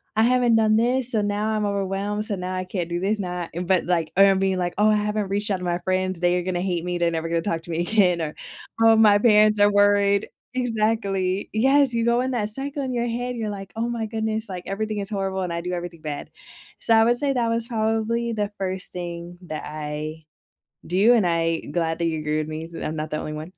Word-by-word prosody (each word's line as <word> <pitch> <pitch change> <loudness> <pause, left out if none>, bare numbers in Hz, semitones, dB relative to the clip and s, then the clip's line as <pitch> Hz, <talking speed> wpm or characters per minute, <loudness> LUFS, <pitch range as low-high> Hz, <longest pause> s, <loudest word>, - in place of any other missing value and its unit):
"I 220 - +4
haven't 245 -1 +4
done 220 -1 +4
this, 245 +2 +1
so, 220 - +1
now 205 +1 -1
I'm 215 -1 0
overwhelmed, 200 +1 -2
so, 210 - -3
now 185 0 -4
I 185 - -2
can't 180 -2 -4
do 175 0 -2
this 205 +4 0
now" 180 -2 -3 0.2
But, 185 -2 +2
like, 170 -3 0
er, 195 - +8
I'm 195 -1 +5
being, 190 -1 +1
like, 175 -1 -1
"Oh 215 - +5
I 215 - +4
haven't 210 -1 -1
reached 205 +1 -1
out 195 - +1
to 180 - -8
my 175 0 0
friends, 185 -1 -1
they 175 0 +2
are - - -4
gonna 180 -1 -2
hate 180 -3 -1
me, 180 0 -2
they're 170 -1 +1
never 165 0 -3
gonna 170 0 +1
talk 165 -5 -1
to - - -11
me 165 +1 -1
again," 180 -2 +3
or, 155 -1 -3 0.5
"Oh, 225 0 +7
my 210 -2 +6
parents 215 -1 +5
are 205 0 +5
worried" 205 0 +3 0.3
Exactly, 215 -5 0
yes, 265 +3 +3
you 230 0 0
go 235 +1 +3
in 260 +1 -1
that 215 -4 -1
cycle 275 +5 -4
in 260 - -3
your 240 -1 0
head, 245 +1 -3
you're 225 -2 -3
like, 195 -1 -8
"Oh 230 +1 -1
my 235 -2 -2
goodness, 220 0 -3
like, 180 -2 -6
everything 215 +2 -3
is 200 -1 -4
horrible, 195 -1 -2
and 180 -2 -3
I 170 - -2
do 180 +1 -4
everything 175 -2 -6
bad," 150 -2 -6 0.5
so, 225 - +3
I 225 - +6
would 240 +1 +2
say 280 -1 +1
that 240 -3 0
was 230 0 -1
probably 225 +1 0
the 210 -1 -2
1st 190 -1 -4
thing 175 0 -6
that 155 -3 -5
I 155 +1 -5 0.6
do, 200 +8 +4
and 220 -5 +3
I 165 -1 +1
glad 165 +1 -2
that 170 - 0
you 160 -1 -1
agree 150 0 -1
with 155 - -3
me, 155 +1 -5
so 170 - -8
I'm 155 - -3
not 155 0 -4
the 155 - -1
only 155 - -5
one. 155 +4 -7
200 Hz, 250 wpm, -23 LUFS, 175-220 Hz, 0.6 s, er